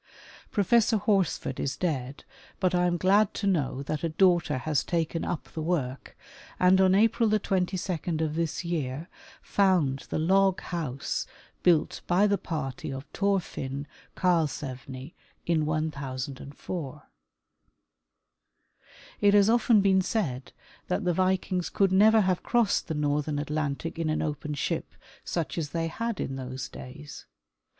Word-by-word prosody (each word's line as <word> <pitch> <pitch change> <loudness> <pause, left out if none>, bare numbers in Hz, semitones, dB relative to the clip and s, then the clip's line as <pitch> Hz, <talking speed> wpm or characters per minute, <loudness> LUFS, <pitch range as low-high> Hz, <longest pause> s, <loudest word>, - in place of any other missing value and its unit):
Professor 220 +2 +3
Horsford 195 -10 0
is 135 - -2
dead, 140 -6 -3 0.4
but 185 -1 +1
I 180 0 +3
am 175 0 +1
glad 195 +3 +3
to 205 - -3
know 140 -8 0
that 150 +2 -3
a 165 - +1
daughter 175 -3 +3
has 145 +2 0
taken 165 -1 -1
up 170 - -3
the 160 - -4
work, 145 -6 -3 0.4
and 185 +1 +5
on 190 0 +5
April 225 +2 +3
22 190 -3 0 0.3
of 150 - -3
this 165 0 -2
3''ear 155 -4 -3 0.4
found 175 -9 +2
the - - -1
log 190 +4 +3
house 150 -7 -3 0.3
built 170 -4 +2
by 180 +4 +4
the 200 -1 +2
party 150 -8 -4
of 135 +1 -6
Thorfinn 165 -8 -1 0.3
Karlsevne 140 -6 -1 0.3
in 160 -3 +1
1004. 140 0 -4 2.2
It 205 0 +5
has 205 +1 +6
often 235 -2 +4
been 190 -1 +4
said 155 - -2 0.4
that 185 +3 -1
the 180 -1 +1
Vikings 185 0 0
could 195 -2 +2
never 215 +3 +6
have 185 -2 +1
crossed 235 -4 +1
the 160 - -3
northern 150 0 0
Atlantic 150 +2 -3
in 165 -1 0
an 155 - 0
open 150 0 -3
ship - - -3 0.3
such 170 0 -2
as 150 -3 -3
they 165 +1 -2
had 230 +4 -3
in 135 - -3
those 130 -3 -5
days. 145 +3 -10
165 Hz, 140 wpm, -28 LUFS, 145-190 Hz, 2.2 s, has